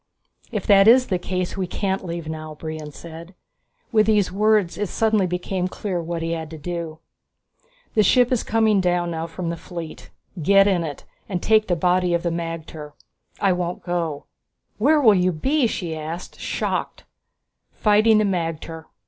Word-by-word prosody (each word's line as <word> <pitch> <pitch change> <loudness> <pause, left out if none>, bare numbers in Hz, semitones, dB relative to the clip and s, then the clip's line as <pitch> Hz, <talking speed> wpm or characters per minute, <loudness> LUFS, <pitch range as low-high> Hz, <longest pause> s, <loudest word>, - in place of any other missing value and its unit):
"If 210 -5 -3
that 195 0 +6
is 250 +2 +7
the 185 -3 0
case 180 0 -3
we 190 -2 -2
can't 190 +1 -2
leave 170 -2 -5
now," 155 -1 -6
Brion 155 -1 -7
said. 170 +4 -11 0.6
With 215 -2 +3
these 205 -4 +3
words 210 -2 +2
it 205 -3 -1
suddenly 220 -4 +2
became 180 +1 -2
clear 185 -1 -3
what 165 0 -4
he 165 - -2
had 160 -2 -4
to 160 - -8
do. 165 0 -5 1.0
"The 215 - +4
ship 245 +5 +4
is 250 - +2
coming 220 -3 +2
down 175 -1 0
now 165 0 -3
from 170 +1 -4
the 170 - -5
fleet. 170 -2 -8 0.3
Get 195 +5 +5
in 185 -4 +2
it 150 -4 -6 0.3
and 185 -3 -1
take 215 +3 +3
the 175 - +1
body 180 +1 +2
of 170 - -2
the 170 - 0
magter. 165 -3 -6 0.5
I 195 - +3
won't 180 0 -3
go." 165 -5 -3 0.5
"Where 300 +7 +4
will 230 -7 +6
you 185 -1 +2
be?" 265 - +1
she 170 -6 -4
asked, 160 +3 -7
shocked. - - -3 0.7
"Fighting 215 +1 +4
the 215 - +3
magter. 165 -3 -3
180 Hz, 175 wpm, -22 LUFS, 165-205 Hz, 1.0 s, is